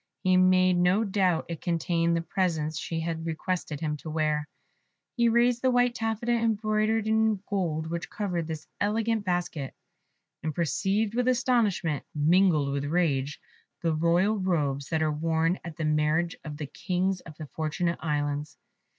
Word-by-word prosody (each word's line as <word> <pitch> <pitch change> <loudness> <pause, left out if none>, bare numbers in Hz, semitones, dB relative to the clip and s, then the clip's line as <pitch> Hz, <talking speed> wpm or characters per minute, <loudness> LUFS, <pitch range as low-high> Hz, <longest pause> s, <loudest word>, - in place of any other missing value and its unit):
He 185 0 +4
made 185 0 +4
no 180 +5 +3
doubt 190 -5 +1
it 170 -2 -6
contained 170 0 +1
the 165 - -2
presents 160 -4 -1
she 165 -1 -3
had 165 0 -3
requested 165 -2 -3
him 150 -2 -1
to 155 - -8
wear. 155 -1 0 0.7
He 235 -2 +3
raised 240 +1 +3
the 260 - +3
white 245 -1 +3
taffeta 225 0 -2
embroidered 220 -1 +1
in 220 -2 +2
gold 170 -6 -1
which 170 +1 -4
covered 180 -6 -2
this 160 -1 -5
elegant 220 +1 0
basket, 175 -6 -2 0.7
and 155 -2 -3
perceived 195 - 0
with 250 +1 0
astonishment, 230 - +1
mingled 155 -2 +3
with 140 0 -2
rage, 145 -3 0 0.4
the 165 -1 +2
royal 175 +7 +2
robes 145 -7 -1
that 160 -1 +1
are 155 - +1
worn 165 +3 0
at 165 -1 -8
the 160 - -2
marriage 155 +2 +1
of 150 -2 -7
the 150 - -4
Kings 185 +5 -1
of 155 -2 -12
the 155 - -6
Fortunate 160 +3 -2
Islands. 145 -1 -2
170 Hz, 160 wpm, -27 LUFS, 155-205 Hz, 0.7 s, He